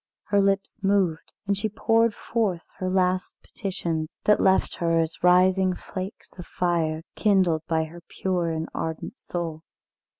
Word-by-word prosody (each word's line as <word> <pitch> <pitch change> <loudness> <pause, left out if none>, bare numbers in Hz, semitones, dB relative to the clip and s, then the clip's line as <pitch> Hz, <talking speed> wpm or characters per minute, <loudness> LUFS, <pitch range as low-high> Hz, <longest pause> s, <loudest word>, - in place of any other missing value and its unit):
Her 200 -1 +2
lips 195 +3 0
moved, 195 -5 +1
and 200 0 +1
she 200 +2 -1
poured 225 +1 +2
forth 200 -7 -1 0.2
her 185 - -1
last 185 0 +1
petitions, 170 -5 -4
that 210 - +4
left 190 0 +3
her 165 -1 +2
as 160 0 -2
rising 185 +1 +4
flakes 190 +2 -7
of 175 - -8
fire, 165 -3 0
kindled 185 -7 +3
by 160 -1 +1
her 165 +2 -10
pure 180 -3 -1
and 160 0 -2
ardent 160 +9 -4
soul. 165 -3 -4
180 Hz, 145 wpm, -25 LUFS, 165-195 Hz, 0.2 s, that